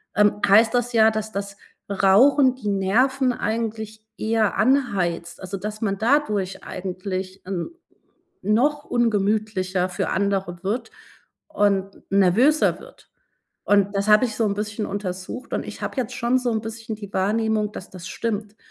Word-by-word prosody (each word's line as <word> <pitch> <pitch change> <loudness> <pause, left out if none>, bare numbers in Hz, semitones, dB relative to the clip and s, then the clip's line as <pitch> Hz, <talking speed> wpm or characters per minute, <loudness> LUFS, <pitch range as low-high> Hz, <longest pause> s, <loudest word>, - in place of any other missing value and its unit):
ähm 210 0 +3
heißt 220 +4 +5
das 245 0 0
ja, 220 -1 +6
dass 220 0 -4
das 200 -1 -5 0.3
Rauchen 250 +8 +5
die 215 -5 -4
Nerven 250 +7 +2
eigentlich 220 -1 -4
eher 220 -1 +1
anheizt, 200 -11 0
also 190 +1 -5
dass 210 +2 -5
man 200 -3 -1
dadurch 215 -6 0
eigentlich 185 +1 -5
n 185 -2 -3 0.7
noch 275 +9 +2
ungemütlicher 210 -5 0
für 180 - -2
andere 195 -3 -1
wird 210 +6 -2 0.6
und 200 -9 0
nervöser 210 - +3
wird. - - -16 0.6
Und 200 0 +3
das 200 +1 -1
habe 210 +4 +6
ich 220 - -2
so 230 - +1
'n 200 -2 0
bisschen 210 +1 -3
untersucht, 195 +4 -5
und - - -2
ich - - -9
habe - - -4
jetzt 250 -1 -2
schon 240 +2 +1
so 250 -1 -1
'n 220 -1 0
bisschen 225 0 -6
die 205 -2 -10
Wahrnehmung, 215 +2 0
dass 185 - -9
das 185 -1 -9
stimmt, 215 -2 -4
210 Hz, 150 wpm, -23 LUFS, 195-230 Hz, 0.7 s, ja